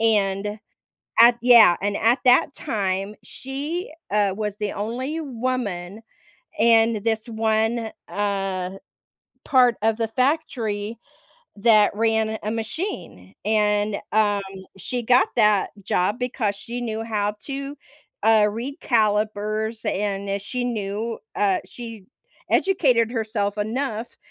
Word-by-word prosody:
And 205 -1 +1 0.6
at 235 +1 +8
Yeah, 235 -7 +8
and 205 +1 -1
at 235 +3 +3
that 250 +2 +5
time, 195 -5 -2
she, 290 +7 -5 0.2
uh, 205 -2 +2
was 210 -1 -3
the 210 -2 -2
only 255 +9 -3
woman 225 - -3 0.6
in 225 -3 +4
this 225 +1 -1
one, 220 +1 0 0.2
uh, 195 -3 -2 0.8
part 250 -4 +4
of 220 0 +2
the 225 -1 0
factory 230 -5 -1 0.6
that 210 -1 +4
ran 220 0 +1
a 215 - -2
machine. 220 - -5
And, 210 -1 +1 0.2
um, 205 -1 +2 0.3
she 245 +6 -4
got 250 +3 +4
that 210 -4 +3
job 190 +4 0
because 250 -5 -1
she 235 +4 -6
knew 225 -2 -3
how 210 -2 -1
to, 275 +1 -6 0.5
uh, 220 0 +5
read 245 +7 -5
calipers, 215 -1 0
and 200 0 -2
i 200 - 0
she 245 +5 -4
knew 220 -1 -3 0.2
uh, 195 -2 +2
she 230 -5 -9 0.4
educated 260 - +3
herself 215 -3 -2
enough 225 +1 -3
220 Hz, 120 wpm, -23 LUFS, 205-240 Hz, 0.8 s, at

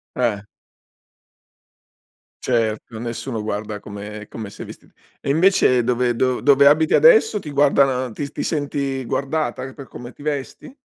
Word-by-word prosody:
Eh. 115 -5 -1 2.0
Certo, 115 -2 -1
nessuno 115 0 -4
guarda 105 0 -4
come 105 +1 -9
come 110 -3 -7
sei - - -9
vestit - - -13 0.3
e - - -4
invece 155 -5 +4
dove 125 0 +1
dov 130 +1 0
dove 140 0 +5
abiti 155 +2 +4
adesso 445 - +5
ti 155 - -9
guardano 135 -3 +2
ti 140 +6 -5
ti - - -3
senti 140 -3 -2
guardata 135 -1 -2
per 140 -1 -11
come 120 0 -10
ti 145 - -15
vesti? 150 - -5
130 Hz, 140 wpm, -21 LUFS, 115-145 Hz, 2.0 s, dove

